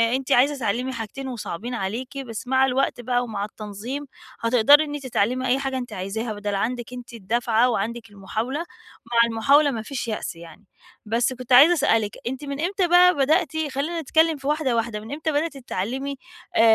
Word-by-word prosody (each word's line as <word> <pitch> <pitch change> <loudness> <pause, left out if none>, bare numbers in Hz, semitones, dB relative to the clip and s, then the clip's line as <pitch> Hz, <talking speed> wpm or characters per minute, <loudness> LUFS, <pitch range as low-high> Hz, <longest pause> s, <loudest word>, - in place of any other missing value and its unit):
أنتِ 270 +1 -4
عايزة 280 +4 +4
تتعلّمي 250 +2 -2
حاجتين 235 +4 -6
وصعبين 240 -1 -5
عليكِ، 240 +6 -4
بس 245 -3 -6
مع 265 +1 +4
الوقت 265 -1 0
بقى 245 +1 0
ومع 210 -4 -3
التنظيم، 215 +7 -6 0.3
هتقدري 250 +6 +5
إن 295 -1 -5
أنتِ 285 - -7
تتعلّمي 250 +3 0
أي 255 +2 +2
حاجة 270 -1 -2
أنتِ 245 -1 -6
عايزاها، 215 +5 -3
بدل 205 -1 -3
عندِك 240 +4 -3
أنتِ 245 -1 -9
الدَّفعة 230 +2 +1
وعندِك 230 +1 -3
المحاولة، 220 +8 -4 0.5
مع 235 0 0
المحاولة 280 +6 +4
ما 225 -3 -3
فيش 245 +1 -5
يأس 215 -5 -4
يعني. 165 +4 -13 0.4
بس 235 +4 +1
كُنت 255 0 -10
عايزة 280 +8 +8
أسأل 275 -8 +3
لِك، 210 0 -5
أنتِ 265 +3 -4
من 280 0 -5
إمتى 370 +1 0
بقى 355 0 +6
بدأتِ 300 +4 +2 0.2
خلّينا 320 +5 -2
نتكلّم 320 +1 +2
في 270 - -7
واحدة، 295 -4 +1
واحدة، 230 -2 -1
من 220 +3 -10
إمتى 310 +2 -2
بدأتِ 295 0 -1
تتعلّمي 265 +4 -4 0.4
آآ، - - +5
250 Hz, 185 wpm, -23 LUFS, 225-280 Hz, 0.5 s, عايزة